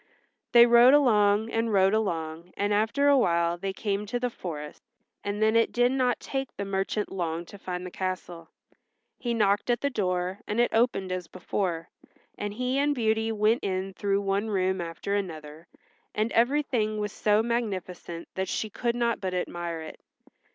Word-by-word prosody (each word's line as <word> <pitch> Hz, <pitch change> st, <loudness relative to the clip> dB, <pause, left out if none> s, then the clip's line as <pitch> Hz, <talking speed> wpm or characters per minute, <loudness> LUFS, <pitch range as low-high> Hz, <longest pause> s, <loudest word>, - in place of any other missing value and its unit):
They 235 Hz, 0 st, +9 dB
rode 240 Hz, +3 st, +7 dB
along 215 Hz, -5 st, +3 dB
and 225 Hz, 0 st, 0 dB
rode 195 Hz, 0 st, +4 dB
along 170 Hz, -5 st, -2 dB
and 205 Hz, +1 st, +1 dB
after 225 Hz, +7 st, +2 dB
awhile 170 Hz, -11 st, +3 dB
they 195 Hz, +1 st, -2 dB
came 205 Hz, +1 st, -2 dB
to 245 Hz, +3 st, -2 dB
the 250 Hz, 0 st, -1 dB
forest, 150 Hz, -7 st, -7 dB, 0.4 s
and 205 Hz, +1 st, -1 dB
then 220 Hz, +1 st, +3 dB
it 230 Hz, 0 st, +3 dB
did 245 Hz, +1 st, +3 dB
not 255 Hz, -2 st, +1 dB
take 270 Hz, -1 st, -4 dB
the 200 Hz, -, -3 dB
merchant 195 Hz, +2 st, -2 dB
long 170 Hz, -2 st, -3 dB
to 200 Hz, -, -12 dB
find 180 Hz, -1 st, -5 dB
the 180 Hz, -, -7 dB
castle. 180 Hz, -3 st, -5 dB, 0.7 s
He 240 Hz, -1 st, -1 dB
knocked 205 Hz, 0 st, +2 dB
at 240 Hz, -, +1 dB
the 280 Hz, -, 0 dB
door, 185 Hz, -3 st, -1 dB
and 210 Hz, -, -1 dB
it 240 Hz, -, +2 dB
opened 225 Hz, -5 st, +1 dB
as 180 Hz, -2 st, -3 dB
before, 175 Hz, -2 st, -3 dB, 0.5 s
and 205 Hz, 0 st, -4 dB
he 255 Hz, +3 st, 0 dB
and 290 Hz, +1 st, +2 dB
Beauty 220 Hz, -2 st, +1 dB
went 215 Hz, +2 st, +2 dB
in 190 Hz, 0 st, -2 dB
through 200 Hz, +1 st, 0 dB
one 200 Hz, +2 st, 0 dB
room 190 Hz, -2 st, 0 dB
after 170 Hz, +4 st, -4 dB
another, 160 Hz, -5 st, -5 dB, 0.5 s
and 215 Hz, +2 st, 0 dB
everything 240 Hz, -4 st, +1 dB
was 210 Hz, -1 st, -2 dB
so 210 Hz, +2 st, +2 dB
magnificent 190 Hz, -7 st, -3 dB
that 190 Hz, 0 st, -2 dB
she 220 Hz, -, -3 dB
could 235 Hz, +3 st, -1 dB
not 235 Hz, -2 st, 0 dB
but 185 Hz, -2 st, -2 dB
admire 175 Hz, -2 st, -3 dB
it. 160 Hz, -, -9 dB
205 Hz, 175 wpm, -27 LUFS, 185-230 Hz, 0.7 s, They